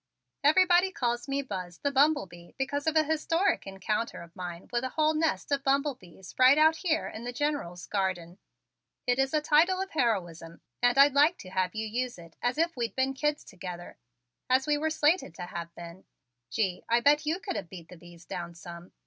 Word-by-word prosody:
"Everybody 360 +4 +5
calls 240 -5 -2
me 280 0 -1
Buzz 185 -7 -6
the 285 - -1
Bumble 285 0 +3
Bee 175 -1 -15
because 285 +2 -2
of 315 - +1
a 315 - +5
historic 330 - 0
encounter 195 +3 -3
of 170 0 -17
mine 175 -1 -7
with 240 +1 0
a 260 - -2
whole 310 +3 +2
nest 315 -1 -1
of 280 -1 +1
bumblebees 270 - -2
right 255 +3 +7
out 315 +1 +5
here 320 -3 0
in 220 - -8
the 245 - -4
General's 245 - -3
garden. 185 -3 -2 0.7
It 250 +1 +1
is 270 0 +2
a 305 - +1
title 325 +5 +3
of 385 +1 -3
heroism 175 - -2 0.2
and 245 +1 +3
I'd 280 0 +7
like 300 +5 +4
to 185 - -11
have 185 0 -1
you 220 0 -2
use 240 +2 -3
it 170 -1 -14
as 245 +3 0
if 335 +1 +1
we'd 235 -2 -3
been 265 0 +1
kids 295 +2 -1
together 180 -2 -9 0.5
as 260 +1 +3
we 300 -1 +2
were 310 +2 0
slated 310 - +1
to 180 - -7
have 170 -1 -6
been. 170 +2 -10 0.4
Gee, 185 - -1
I 235 +1 +4
bet 295 +3 +3
you 325 +4 0
could 385 -1 -5
have 165 - -5
beat 170 -3 -11
the 180 - -11
bees 175 0 -15
down 170 -1 -6
some. 170 +1 -11
250 Hz, 205 wpm, -29 LUFS, 180-300 Hz, 0.7 s, right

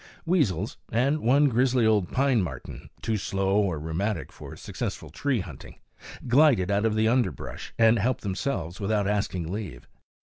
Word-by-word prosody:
Weasels, 120 - 0
and 135 +6 +2
one 140 +3 +4
grizzly 125 -1 +2
old 105 -5 +2
pine 135 -4 +2
marten, 90 - -7
too 110 -1 0
slow 95 0 0
or 95 -6 0
rheumatic 80 +5 -3
for - - -10
successful - - -5
tree 135 -7 -1
hunting, 75 -8 -10 0.5
glided 125 -7 +4
out 100 +2 +2
of 110 - -1
the 110 0 +2
underbrush 120 +1 -1
and 115 0 +5
helped 120 +4 0
themselves 95 -3 -3
without 105 0 0
asking 95 -5 -1
leave. 95 - -6
110 Hz, 155 wpm, -26 LUFS, 95-125 Hz, 0.5 s, and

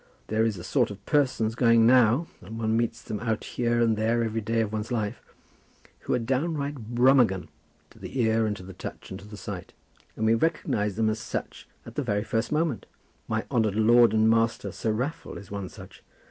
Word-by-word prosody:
There 110 +1 +2
is 110 -4 -1
a 85 - -8
sort 125 +4 +1
of 100 0 -10
persons 130 -7 +1
going 115 -1 +4
now, 125 +4 +5 0.2
and 110 +5 -8
one 110 -1 0
meets 115 0 -1
them 105 - -4
out 110 0 -2
here 120 -1 0
and 115 -2 +3
there 115 +2 +1
every 115 0 -2
day 115 +2 0
of 110 -1 -2
one's 110 +2 -3
life, 110 -4 -2 0.8
who - - -1
are - - +2
downright 135 -1 -2
Brummagem 120 -7 +4 0.4
to - - -18
the 135 - -6
ear 110 -1 +2
and 105 -1 -2
to 95 - -10
the 95 +1 -10
touch - - -8
and 95 - -6
to 100 - -13
the 105 0 -10
sight, 100 -3 -7 0.4
and 110 - -1
we 110 - +4
recognize 115 - 0
them 110 0 +1
as 110 - -3
such - - -6 0.2
at - - -10
the - - -2
very 105 0 0
first 115 +1 -2
moment. 150 - 0 0.4
My - - -1
honoured 110 -4 +1
lord 115 +2 +5
and 110 0 +3
master, 115 -3 +1
Sir 110 +3 -2
Raffle, 130 +10 -3
is 100 - -12
one 100 -2 -4
such. - - -13
115 Hz, 210 wpm, -26 LUFS, 105-120 Hz, 0.8 s, now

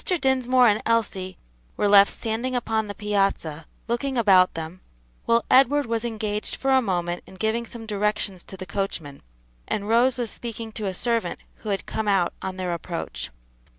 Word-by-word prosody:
Dinsmore 260 - +3
and 210 -1 +3
Elsie 195 -5 0 0.4
were 205 - +2
left 200 0 +7
standing 235 +3 -2
upon 220 -3 0
the 205 - -6
piazza, 195 -7 -1 0.2
looking 255 +3 -1
about 190 -5 +5
them, 165 +3 -6 0.4
while 230 0 +3
Edward 275 +2 +5
was 230 -1 -1
engaged 215 -2 -2
for 270 - 0
a 265 0 +5
moment 175 -5 -1
in - - -13
giving 220 +4 -1
some 230 -1 -8
directions 205 -3 -1
to 190 - -10
the 185 - -6
coachman, 175 -7 -4 0.5
and 205 -1 -2
Rose 240 +3 +3
was 235 -4 -2
speaking 230 -1 -6
to 215 -2 -3
a 190 - -2
servant 230 +3 0 0.2
who 215 - -7
had 195 -1 -1
come 220 -1 -3
out 195 -4 +2
on 190 0 -4
their 180 -2 -2
approach. 165 - -5
215 Hz, 175 wpm, -24 LUFS, 190-235 Hz, 0.5 s, left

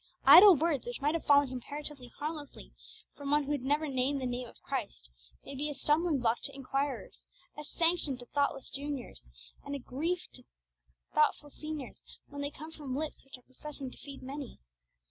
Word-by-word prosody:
Idle 385 0 +11
words, 300 -4 0
which 245 - -4
might 290 +2 +1
have 330 - -2
fallen 285 -1 +6
comparatively 260 0 -6
harmlessly 300 -1 -6 0.4
from 285 -1 -6
one 295 +1 +4
who 285 - -4
had 290 -3 0
never 290 +4 +1
named 270 +1 +1
the 260 - -3
Name 245 0 -3
of - - -14
Christ, - - -4 0.3
may - - -7
be 290 +3 -2
a 295 - -5
stumbling 305 +3 +2
block 240 -2 +1
to - - -4
inquirers, 275 +1 -3 0.3
a 300 - -7
sanction 330 -3 +1
to 245 - -11
thoughtless 280 0 -1
juniors, 280 -2 -5 0.4
and 285 0 -4
a - - -1
grief 320 +8 -2
to 250 - -12 0.7
thoughtful 300 -1 +2
seniors, 305 -4 -7 0.3
when 285 0 -6
they 285 - -1
come 310 +2 -10
from 285 -5 -5
lips 305 +2 -4
which 270 -1 -11
are 250 - -22
professing 270 0 -8
to - - -13
feed 280 -2 -9
many. 275 -1 -6
285 Hz, 185 wpm, -32 LUFS, 260-300 Hz, 0.7 s, Idle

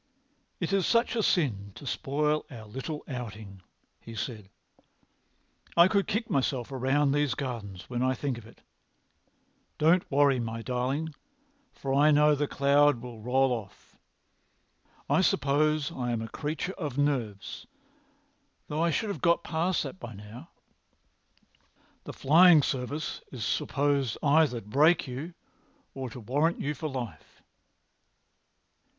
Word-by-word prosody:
"It - - -2
is 195 -3 +2
such 235 +1 +2
a 225 - +1
sin 105 - 0
to - - -11
spoil 150 +3 0
our 115 -5 -10
little 135 +8 -6
outing," 110 -7 -7 0.4
he 115 - -11
said. 110 -3 -5 1.3
"I 170 +1 +8
could 200 -1 +1
kick 220 +2 -1
myself 130 -2 -1
round 135 +2 +1
these 145 -4 +1
gardens 110 -9 -6
when 120 -1 -3
I 130 0 +2
think 130 -1 -3
of 110 - -14
it. - - -18 1.2
Don't 165 +4 +3
worry, 140 -2 +3
my 115 -1 -4
darling, 130 +6 -2 0.6
for 135 -1 -4
I 145 +2 +5
know 150 0 +5
the 145 0 0
cloud 140 -1 +3
will 120 -2 -9
roll 130 +3 +2
off. 110 -6 -7 1.1
I - - +3
suppose 150 +1 +2
I 125 -1 -3
am 115 -1 -2
a - - -5
creature 155 - -4
of 145 -6 -4
nerves, 125 -9 -2 1.0
though 150 +1 -1
I 170 - +3
should 210 +7 -1
have 200 - -4
got 170 -1 +3
past 170 +3 0
that 190 - -7
by 115 -2 -8
now. 110 - -11 1.6
The - - -6
Fly[Pg 170 +5 +6
240]ing - - -6
Service 135 +4 -3
is 120 -6 -4
supposed 140 -2 0
either 145 -4 +3
to 105 - -18
break 150 +10 +4
you 145 +8 -6 0.6
or 130 -2 -5
to 120 - -9
warrant 145 +9 0
you 150 - -1
for 155 +1 -4
life." 120 - -7
140 Hz, 145 wpm, -28 LUFS, 120-150 Hz, 1.6 s, I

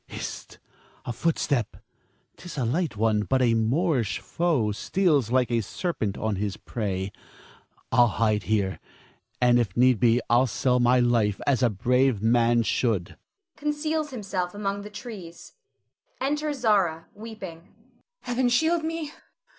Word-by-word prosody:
Hist! - - -7 0.5
a 120 - -3
footstep. 140 -3 -1 0.6
'Tis 180 -4 -10
a 130 - 0
light 150 - -1
one, 110 -1 +2
but 130 +5 +1
a 120 -2 +3
Moorish 120 - +1
foe 155 -11 0
steals 145 - +1
like 125 -1 +2
a 115 -1 +2
serpent 110 - -3
on 110 -3 -2
his 100 0 -3
prey. 100 -4 -3 0.8
I'll 120 0 +5
hide 110 -1 +1
me - - -15
here, 100 -3 0 0.6
and 120 -1 +4
if 110 -4 -2
need 125 -2 +4
be 120 +1 +4
I'll 120 +3 +4
sell 125 +3 +1
my 125 +1 +4
life 115 -4 +2
as 135 -4 +2
a 120 - +4
brave 125 +3 +2
man 115 +1 +3
should 110 -6 -1 0.4
[conceals 300 +1 -2
himself 195 -7 -4
among 200 -1 -2
the 205 - -9
trees]. 205 -5 -9 0.7
[Enter 295 +2 -1
Zara, 200 - +1
weeping. 205 -6 -9
Zara. 165 - -26 0.5
Heaven 245 0 0
shield 320 +7 +2
me! 320 -2 -3
130 Hz, 145 wpm, -26 LUFS, -, 0.8 s, I'll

